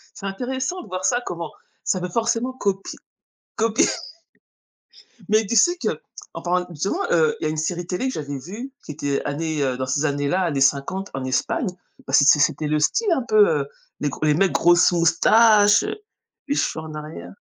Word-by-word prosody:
C'est 205 - -9
intéressant 260 - -3
de - - -14
voir 185 0 -5
ça, 245 +3 +2
comment 170 -3 -5 0.3
ça 185 - 0
veut 180 0 -4
forcément 230 +4 -1
copie 200 -6 -3 0.6
copier 225 0 +2 1.4
mais 215 0 +3
tu 235 - -2
sais 350 - +4
que, - - -1 0.4
en - - -7
parlant 180 0 0
justement, 190 - -2
heu, 460 -1 +3
il - - -7
y - - +2
a - - 0
une 155 - -3
série 170 +3 -2
télé 185 +9 -2
que 260 - -2
j'avais 145 -2 -5
vue 210 - -8
qui - - -6
était 140 -1 -2
année, 155 +1 -2
heu, 130 -2 -1
dans 130 - -2
ces 135 +4 -1
années-là, 145 +5 0
années 155 -7 -1
50 140 +8 +1
en 135 - -4
Espagne. 130 - -1 0.4
Bah, 135 - -6
c'est 145 0 +6
c'était 150 +1 +1
le 150 0 +1
style 415 - +1
un 270 -7 +1
peu, 425 -1 +5
heu, - - -5 0.3
les 145 - 0
gr - - -8
les 150 - +4
mecs, 190 +5 +2
grosses 175 +1 +4
moustaches, 205 +5 +5
heu, 420 +1 -3 0.5
les 285 - 0
cheveux 160 - -1
en 155 - -8
arrière. 150 - -8
180 Hz, 200 wpm, -22 LUFS, 150-230 Hz, 1.4 s, c'est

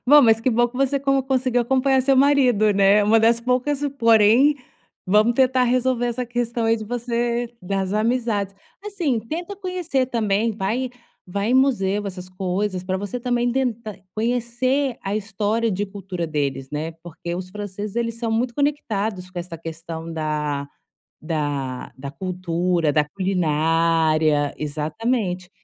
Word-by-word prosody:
Bom, 295 +2 +8
mas 225 -2 +5
que 255 - +1
bom 240 +1 +3
que 245 - -11
você 275 +1 +1
con 275 0 +2
conseguiu 255 -2 +1
acompanhar 265 +2 +2
seu 270 +1 +3
marido, 255 -6 +4
né? 200 +1 +5
Uma 215 +2 +4
das 230 +1 +3
poucas, 255 +4 0 0.2
porém, 230 +5 +5 0.5
vamos 210 +5 +4
tentar 255 0 +3
resolver 250 0 +1
essa 240 +1 -2
questão 240 -1 -2
aí 225 0 +3
de 215 - -6
você 240 +1 -1
das 195 +1 -2
amizades. 215 -3 0 0.3
Assim, 345 - -1
tenta 335 - -5
conhecer 360 -9 -1
também, 225 -2 0
vai 225 +5 -2 0.4
vai 200 +4 -2
em 250 - +2
museu, 210 -7 +2
essas 180 -1 -6
coisas, 185 0 -2
para 185 0 -1
você 205 +4 -4
também 245 0 0
tentar 235 -4 -2 0.2
conhecer 245 +3 0
a 195 +2 -2
história 215 +2 -1
de 205 +2 -2
cultura 190 -4 -5
deles, 140 -3 -2
né? 155 +2 -3
Porque 170 0 -6
os 185 +1 -5
franceses 205 +1 -6
eles 230 -1 -1
são 230 -1 -3
muito 235 +2 0
conectados 220 -10 -1
com 180 - -6
essa 175 -1 -6
questão 165 0 -7
da 150 -2 -2 0.5
da 145 -5 -3
da 140 +1 -7
cultura, 180 -2 -1
da 150 0 +2
culinária, 160 -4 +2
exatamente. 180 - -2
215 Hz, 150 wpm, -22 LUFS, 180-245 Hz, 0.5 s, Bom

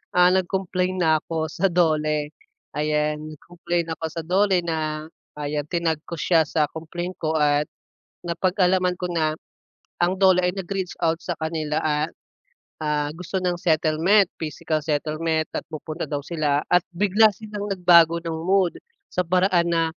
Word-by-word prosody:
ah, 180 0 +6
nag-complain 185 0 0
na 160 -2 +3
ako 160 -1 -2
sa 195 - +1
DOLE, 155 -3 +1 0.5
ayan. 150 0 0 0.2
Nag-complain 170 +2 -3
ako 160 - -5
sa 165 - -4
DOLE 185 +1 +3
na 155 -2 -2 0.3
ayan 145 0 -2
tinag 165 -3 0
ko 170 - -4
siya 165 0 +4
sa 155 -1 +1
complain 175 +3 -5
ko 160 0 -1
at 145 0 +3 0.6
napag-alaman 180 +1 +1
ko 180 - -2
na 155 -2 +1 0.7
ang 175 +2 +2
DOLE 185 -2 +5
ay 180 - +1
nag-reach 190 0 -3
out 165 0 +1
sa 175 - -3
kanila 160 -1 -2
at, 150 0 0 0.7
ah, 150 -1 0
gusto 180 +2 -4
ng 180 -1 +1
settlement. 165 +5 +3 0.2
Physical 155 0 -2
settlement 155 +1 -1
at - - -3
pupunta 155 +1 -5
daw 145 -2 -2
sila 150 -3 0
at 180 - +5 0.2
bigla 210 +3 +5
silang 210 -2 -6
nagbago 170 -3 +5
ng 165 -1 -3
mood, 190 -1 +2 0.4
sa 180 - 0
paraan 180 -1 +2
na 165 -1 +2
165 Hz, 150 wpm, -23 LUFS, 155-180 Hz, 0.7 s, ah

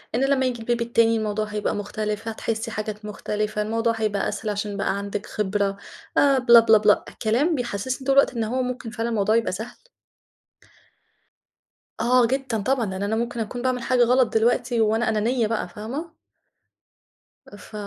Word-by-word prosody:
إن 260 - +1
لمّا 270 -1 +2
ييجي 240 -2 -2
الBaby 240 0 -1
التاني، 230 -1 +2
الموضوع 215 0 -1
هيبقى 210 0 -2
مختلف، 210 +1 -4
هتحسّي 225 +1 -3
حاجات 210 0 -5
مختلفة، 210 0 -3
الموضوع 230 +2 0
هيبقى 215 -3 -1
أسهل 220 - -4
عشان 205 0 -3
بقى 200 0 -1
عندِك 200 0 -4
خبرة، 200 -1 -1 0.4
آآ 280 -1 +5
بِلاَ، 235 -2 +8
بِلاَ، 225 -1 +5
بِلاَ، 210 0 +3 0.2
كلام 250 +10 +2
بيحسسّني 250 +1 -3
طول 270 - +3
الوقت 275 - +5
إن 230 - 0
هو 250 +4 -1
مُمكن 250 -2 -4
فعلًا 235 0 -3
الموضوع 215 -1 +1
يبقى 230 - +1
سهل. 220 +6 -7 2.2
آه، 245 +1 +4
جدًا 265 -3 -1
طبعًا، 260 0 +1
لأن 190 0 -4
أنا 205 +2 0
مُمكن 235 +1 -3
أكون 235 +2 -4
باعمل 255 -1 -1
حاجة 245 +1 +3
غلط 245 -1 +3
دلوقتي، 235 +1 +1
وأنا 220 +1 +2
أنانية 225 +2 +1
بقى 225 -3 -2
فاهمة؟ 265 - -7 1.3
أ - - -14
ف 205 - -15
225 Hz, 170 wpm, -23 LUFS, 210-245 Hz, 2.2 s, بِلاَ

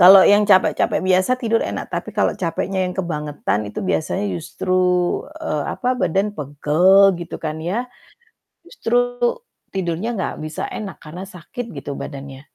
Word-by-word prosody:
Kalau 190 +2 +10
yang 205 +1 +5
capek-capek 190 -2 +4
biasa 185 +6 +3
tidur 230 -2 +1
enak, - - -4
tapi - - -3
kalau - - +3
capeknya 185 0 -1
yang 180 - -7
kebangetan 150 - -2
itu 105 - -5
biasanya 185 +3 0
justru, 185 +2 -1 0.6
eee, 150 -1 -2
apa, 250 +1 +1
badan 200 -2 0
pegel 170 +6 +4
gitu 170 - -6
kan 155 0 -4
ya, 195 +10 -1 0.8
justru 240 - -1 0.7
tidurnya 190 +5 -2
nggak - - -2
bisa 155 0 -4
enak, 195 -6 -6
karena 175 +5 -8
sakit 230 +8 -7
gitu 140 +1 -5
badannya, 135 -1 -7
185 Hz, 145 wpm, -21 LUFS, 155-200 Hz, 0.8 s, Kalau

